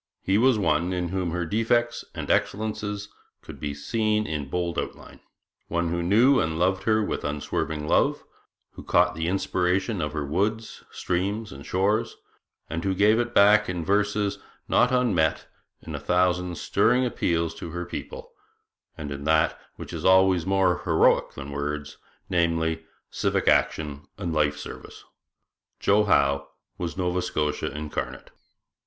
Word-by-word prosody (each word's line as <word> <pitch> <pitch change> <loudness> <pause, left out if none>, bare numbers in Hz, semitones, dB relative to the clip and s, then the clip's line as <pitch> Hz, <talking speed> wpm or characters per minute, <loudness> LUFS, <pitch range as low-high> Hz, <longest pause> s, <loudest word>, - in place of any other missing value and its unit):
He 95 +2 +2
was 130 -1 +4
one 85 -2 +1
in 90 -1 -2
whom 95 -1 -2
her 85 +1 -2
defects 115 +5 +1
and - - -3
excellences 105 -1 -1 0.3
could - - -10
be 70 -1 -4
seen 110 +6 0
in 75 -5 -4
bold 85 +1 -1
outline; - - -7 0.5
one 85 0 -1
who 85 +1 -1
knew 115 +10 +4
and 80 0 -1
loved 95 +2 +1
her 110 -1 +3
with - - -3
unswerving 75 +1 -3
love; - - +2 0.5
who - - -11
caught - - +3
the 80 +1 -3
inspiration 95 +2 0
of 75 -2 -3
her 75 -2 -2
woods, 105 +9 -2
streams, 100 +5 -2
and 70 +2 -10
shores; 105 +5 0 0.5
and 80 +1 -4
who 95 -1 0
gave 105 +4 +4
it 120 0 -2
back 105 +1 +6
in 90 -3 -3
verses 105 +1 +1 0.3
not 125 - +4
unmeet, 120 -11 +1 0.4
in - - -8
a - - -3
thousand 90 -1 +1
stirring 125 +3 +2
appeals 85 -8 0
to - - -8
her 85 +2 -5
people, 480 - -7 0.7
and 75 -2 -6
in 70 0 -6
that 80 0 +2
which - - -9
is - - -5
always 95 -2 +4
more 95 -2 +2
heroic 80 -5 +3
than 70 0 -7
words, 75 +1 -4 0.3
namely, 80 -1 0 0.3
civic - - -1
action 75 -2 +1
and 90 -4 -3
life 75 -2 +1
service. - - -10 0.8
'Joe' 105 +1 +3
Howe 70 -6 +2 0.3
was 85 +1 -4
Nova 90 -1 0
Scotia 75 -3 -1
incarnate. 75 +1 -5
90 Hz, 150 wpm, -25 LUFS, 80-105 Hz, 0.8 s, back